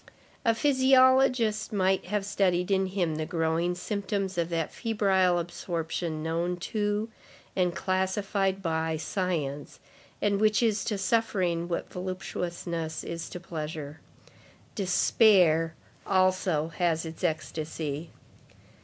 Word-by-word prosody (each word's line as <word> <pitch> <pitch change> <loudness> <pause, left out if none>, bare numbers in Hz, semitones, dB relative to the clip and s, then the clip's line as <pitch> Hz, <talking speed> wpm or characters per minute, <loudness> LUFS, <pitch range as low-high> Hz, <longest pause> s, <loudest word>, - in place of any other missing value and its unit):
A 230 -3 +3
physiologist 260 -4 +4
might 190 -2 +1
have 205 +1 -1
studied 185 -2 +1
in 190 -1 +2
him 180 -5 -1
the 155 - -2
growing 165 0 0
symptoms 195 0 -2
of 170 -1 -1
that 165 -2 -2
febrile 190 -5 +2
absorption 165 -2 -3
known 170 +2 -1
to, 210 +3 -1 0.5
and 180 -2 +1
classified 195 +1 0
by, 160 -1 0
science, 155 -5 -3 0.4
and 200 0 +1
which 215 +1 +3
is 215 -3 +2
to 210 - -1
suffering 190 -5 0
what 170 - -4
voluptuousness 175 -3 -4
is 165 0 -5
to 180 - -7
pleasure. 155 -3 -6 0.7
Despair, 180 -4 +4 0.3
also, 185 -4 +2
has 170 -2 +1
its 160 +1 -8
ecstasy. 155 -1 -3
180 Hz, 110 wpm, -28 LUFS, 165-200 Hz, 0.7 s, physiologist